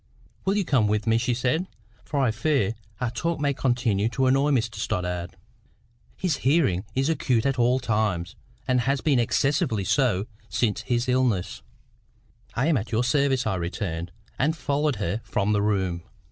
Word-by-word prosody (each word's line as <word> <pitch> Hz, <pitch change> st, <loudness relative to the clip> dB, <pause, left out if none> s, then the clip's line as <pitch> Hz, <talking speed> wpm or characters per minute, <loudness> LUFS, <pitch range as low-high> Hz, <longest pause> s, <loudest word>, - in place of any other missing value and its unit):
"Will 195 Hz, +2 st, +2 dB
you 200 Hz, -, +1 dB
come 125 Hz, -9 st, +3 dB
with 105 Hz, 0 st, 0 dB
me?" 115 Hz, 0 st, +3 dB
she 125 Hz, 0 st, 0 dB
said; 130 Hz, +9 st, 0 dB, 0.4 s
"for 145 Hz, -, -2 dB
I 125 Hz, -4 st, +3 dB
fear 115 Hz, -3 st, +1 dB, 0.3 s
our 125 Hz, -2 st, -1 dB
talk 165 Hz, +7 st, -2 dB
may 145 Hz, -1 st, +1 dB
continue 120 Hz, -5 st, +1 dB
to 130 Hz, +2 st, 0 dB
annoy 135 Hz, +3 st, +3 dB
Mr 115 Hz, -6 st, 0 dB
Stoddart. 90 Hz, -2 st, -3 dB, 0.8 s
His 180 Hz, -6 st, 0 dB
hearing 130 Hz, -, +2 dB
is 135 Hz, +2 st, +1 dB
acute 135 Hz, -7 st, +1 dB
at 135 Hz, -2 st, 0 dB
all 125 Hz, +2 st, +3 dB
times, 105 Hz, -8 st, -1 dB, 0.3 s
and 125 Hz, -1 st, +3 dB
has 135 Hz, +3 st, +1 dB
been 140 Hz, -2 st, +2 dB
excessively 135 Hz, -, +1 dB
so 105 Hz, -4 st, +2 dB, 0.2 s
since 110 Hz, -3 st, 0 dB
his 120 Hz, +3 st, -1 dB
illness." 120 Hz, -, 0 dB, 0.9 s
"I 130 Hz, -, +1 dB
am 160 Hz, -3 st, +3 dB
at 110 Hz, +2 st, -4 dB
your 115 Hz, +2 st, +2 dB
service," 135 Hz, 0 st, +2 dB
I 110 Hz, -, 0 dB
returned, 85 Hz, -1 st, -4 dB, 0.3 s
and 155 Hz, +5 st, +1 dB
followed 145 Hz, -1 st, 0 dB
her 100 Hz, +1 st, -2 dB
from 100 Hz, +2 st, 0 dB
the 105 Hz, -, +2 dB
room. 95 Hz, -4 st, 0 dB
120 Hz, 170 wpm, -25 LUFS, 105-140 Hz, 0.9 s, come